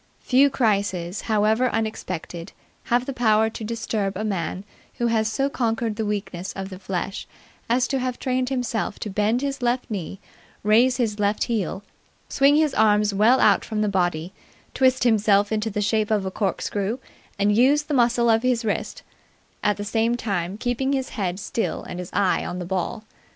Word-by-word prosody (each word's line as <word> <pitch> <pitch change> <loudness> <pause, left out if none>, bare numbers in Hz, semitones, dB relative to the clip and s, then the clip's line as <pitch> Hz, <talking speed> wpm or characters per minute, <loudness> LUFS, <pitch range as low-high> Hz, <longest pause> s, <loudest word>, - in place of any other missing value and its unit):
Few 275 +2 +4
crises, 200 -7 0
however 220 +4 +3
unexpected, 185 -7 -4 0.3
have 240 +1 +1
the 275 - -4
power 220 -2 +3
to 225 - -7
disturb 215 -3 -2
a 215 - -3
man 190 -2 -3 0.3
who 240 - -1
has 220 -1 +1
so 275 +4 0
conquered 230 -4 -1
the 220 -1 -2
weakness 195 -3 -4
of 195 0 -6
the 185 -1 -9
flesh 195 0 -4 0.4
as 245 +1 +2
to 270 - 0
have 255 -1 -2
trained 255 0 -1
himself 245 -5 -2
to 210 - -4
bend 215 +6 +1
his 275 -1 -3
left 245 +1 0
knee, 195 -1 -4 0.4
raise 235 +5 +4
his 220 -4 -1
left 205 +1 +1
heel, 200 -4 -2 0.5
swing 280 +1 +4
his 305 -2 +3
arms 210 -1 +3
well 225 +6 +4
out - - +4
from 215 -2 -3
the - - +1
body, 175 -3 -1 0.4
twist 260 -1 +3
himself 210 -3 +3
into 220 0 0
the 210 0 -2
shape 215 +1 +1
of 210 -3 +1
a 190 - -3
corkscrew 200 +2 -2 0.4
and 205 +1 +2
use 275 +6 +4
the 295 - -4
muscle 240 -2 +3
of 225 -1 +4
the 250 -1 +2
wrist, 215 - -3 0.6
at 210 - +1
the 205 - -5
same 225 +3 +1
time 195 -4 -2
keeping 245 +4 -1
his 265 -1 -1
head 190 -4 -3
still 225 +3 -3
and 180 - -7
his 180 - -6
eye 195 -1 +1
on 180 - -4
the 180 - -4
ball. 190 +4 -3
220 Hz, 180 wpm, -23 LUFS, 200-245 Hz, 0.6 s, Few